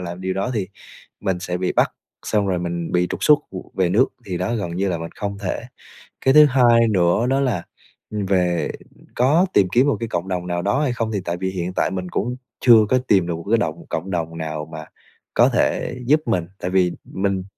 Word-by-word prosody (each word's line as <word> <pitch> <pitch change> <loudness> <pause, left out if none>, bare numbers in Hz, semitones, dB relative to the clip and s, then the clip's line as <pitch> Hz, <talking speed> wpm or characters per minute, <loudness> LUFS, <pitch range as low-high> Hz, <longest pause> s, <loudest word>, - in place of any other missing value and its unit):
làm 90 0 -6
điều 95 0 -2
đó 100 +6 -1
thì 100 -4 -2 0.5
mình 95 -2 -1
sẽ 90 -1 -3
bị 90 0 -1
bắt, - - +2 0.3
xong 105 -2 +1
rồi 95 -2 0
mình 85 -1 -4
bị 90 0 +2
trục - - -3
xuất 150 -1 +6 0.4
về 95 -2 +2
nước, 115 +8 +4 0.2
thì 90 -3 -3
đó 95 +6 -1
gần 90 -6 -3
như 95 +2 0
là 85 -3 -1
mình 85 0 -6
không 100 -1 -4
thể. 100 +3 -3 0.6
Cái 135 - +5
thứ 150 +1 +9
hai 120 -4 +4
nữa 90 +2 +2
đó 135 +1 +2
là, 120 -11 0 0.5
ừm, 105 -2 -3
về 90 -3 +1 0.4
có 145 +9 +4
tìm 95 - +4
kiếm 125 +6 +4
một 145 - +1
cái 115 - -4
cộng 85 -2 -2
đồng 90 -2 -3
nào 85 0 -1
đó 100 +10 +1
hay 130 -5 0
không? 115 -2 -2
Thì 105 - -1
tại 85 0 -2
vì 95 +1 -2
hiện 90 -1 -4
tại - - 0
mình 90 -1 -4
cũng 120 +8 -2 0.2
chưa 115 -4 +6
có 130 - +4
tìm 95 -4 +3
được 85 - -2
một 85 - -8
cái 115 - +4
động 80 -8 -3
cộng 90 +4 -3
đồng 80 -2 -3
nào 80 -1 -4
mà 80 0 -7 0.5
có - - +5
thể - - 0
giúp 150 +5 +4
mình, 90 -8 0
tại 90 - -3
vì 90 -2 +3
mình 95 -1 -2
95 Hz, 230 wpm, -21 LUFS, 90-115 Hz, 0.6 s, thứ